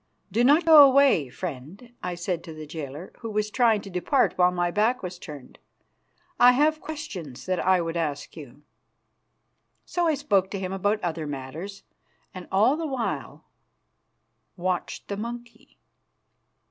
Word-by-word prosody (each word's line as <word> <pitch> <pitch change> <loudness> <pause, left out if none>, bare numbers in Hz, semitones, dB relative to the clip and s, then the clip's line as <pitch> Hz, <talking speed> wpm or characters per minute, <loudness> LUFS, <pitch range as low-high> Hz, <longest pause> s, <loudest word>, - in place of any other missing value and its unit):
"Do 235 - +2
not 295 +6 +5
go 315 -2 +9
away, 270 - +4
friend," 180 - -8
I 180 -1 -3
said 175 0 -3
to 165 - -8
the 155 0 -8
jailer, 150 +2 -8
who 230 - -6
was 210 0 -1
trying 230 -4 +3
to 200 - -10
depart 180 +9 +1
while 180 -1 +4
my 175 -1 -1
back 220 +6 +1
was 180 -1 -6
turned. 145 -7 -11 0.8
"I 245 +1 +8
have 305 +4 +2
questions 195 - -7
that 185 -1 -1
I 185 -1 +3
would 165 0 -4
ask 150 -4 -3
you." 145 -2 -12 1.2
So 350 -1 0
I 315 - +2
spoke 200 -10 +1
to 200 - -4
him 190 0 -4
about 205 +3 0
other 165 -3 -3
matters, 145 +8 -7 0.5
and 185 -1 -9
all 215 +8 +4
the 325 -1 -3
while 260 -5 -4 1.1
watched 180 0 -3
the 200 - -4
monkey. 235 +2 -8
190 Hz, 155 wpm, -25 LUFS, 165-240 Hz, 1.2 s, go